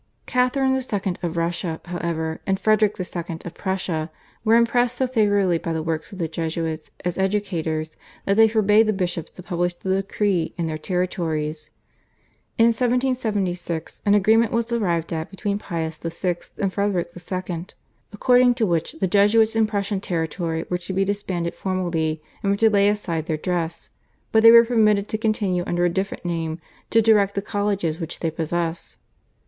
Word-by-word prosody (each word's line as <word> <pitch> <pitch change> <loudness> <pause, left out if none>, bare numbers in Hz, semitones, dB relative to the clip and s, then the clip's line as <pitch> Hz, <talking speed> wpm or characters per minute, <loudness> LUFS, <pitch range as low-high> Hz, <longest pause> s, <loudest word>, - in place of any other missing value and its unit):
Catharine 260 +1 +2
II. 205 -8 -1
of 170 -1 -3
Russia, 170 -1 -1
however, 170 -2 -3
and 190 0 +1
Frederick 215 0 +3
II. 170 -2 -4
of 175 - -6
Prussia 180 -5 -2 0.3
were 225 0 +4
impressed 245 +1 +2
so 260 - +2
favourably 205 -8 +2
by 165 - -3
the 160 -1 -2
work 160 +3 -3
of 195 - -9
the 170 -3 -1
Jesuits 160 0 -3 0.2
as 180 +1 -2
educators 165 -6 -1 0.3
that 200 - +2
they 225 +1 +7
forbade 215 0 +4
the 215 - +2
bishops 180 -4 -2
to 180 - -11
publish 175 -1 -1
the 190 +2 -1
decree 195 -4 -1
in 170 - -1
their 155 -1 -3
territories. 160 -4 -2 0.9
In 230 0 +6
1776 225 -9 -1
an 205 0 +4
agreement 220 +3 +4
was 230 0 0
arrived 170 -8 0
at 160 0 -3
between 200 +1 -3
Pius 160 -4 -4
VI. 170 +1 -2 0.2
and 195 -2 -1
Frederick 200 -4 0
II., 180 -1 -4 0.5
according 245 +3 +4
to 235 -3 +1
which 170 - -1
the 320 -12 -1
Jesuits 215 +4 +4
in 220 -1 +3
Prussian 200 -2 -2
territory 165 -2 -2
were 180 - -1
to 180 +2 -6
be 195 +1 +1
disbanded 190 -4 -2
formally 170 -5 -2 0.2
and 200 - +1
were 200 - +1
to 220 +1 +4
lay 200 -1 +4
aside 170 -6 -2
their 155 - -1
dress, 170 0 -3 0.4
but 220 - +5
they 230 - +9
were 235 0 +9
permitted 215 -4 +3
to 215 - -2
continue 205 -5 0
under 175 0 +1
a - - +3
different 190 +1 -3
name 165 -1 -2 0.3
to 225 0 +4
direct 205 -3 +4
the 200 - 0
colleges 200 -6 -1
which 165 -1 -6
they 165 - 0
possessed. 165 +1 -3
190 Hz, 170 wpm, -23 LUFS, 165-215 Hz, 0.9 s, they